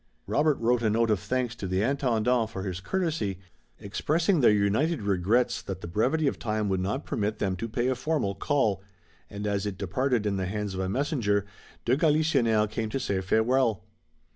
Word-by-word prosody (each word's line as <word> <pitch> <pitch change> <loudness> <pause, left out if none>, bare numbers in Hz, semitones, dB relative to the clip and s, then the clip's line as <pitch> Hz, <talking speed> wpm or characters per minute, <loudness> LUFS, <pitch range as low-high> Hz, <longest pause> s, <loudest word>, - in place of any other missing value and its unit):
Robert 150 -1 +2
wrote 120 +1 +1
a 110 - +2
note 115 +1 +2
of 105 - +2
thanks 125 +3 -1
to 95 - -4
the 95 +2 0
Intendant 125 -3 +1
for 95 - -6
his 95 -2 -4
courtesy, 150 - -2 0.4
expressing 160 - +1
their 120 - +6
united 105 +8 +1
regrets 100 +5 +1
that 95 -1 -6
the - - -6
brevity 130 - +1
of 140 - 0
time 105 -2 -1
would 95 -1 0
not 105 +10 -2
permit 105 +1 -2
them 95 -2 -1
to 115 +4 -4
pay 120 +3 -1
a 130 - +2
formal 130 -5 -1
call, 110 -5 0 0.5
and 100 +1 -6
as 100 0 -1
it 100 -3 -4
departed 115 +5 0
in 100 -2 0
the 95 -1 -2
hands 105 0 -3
of 95 - -4
a 95 0 -1
messenger, 115 - 0 0.4
de 125 - +3
Galisonnière 140 -8 +3
came 110 +1 -3
to 135 - -2
say 100 -7 -1
farewell. 110 +2 +2
110 Hz, 190 wpm, -27 LUFS, 100-130 Hz, 0.5 s, their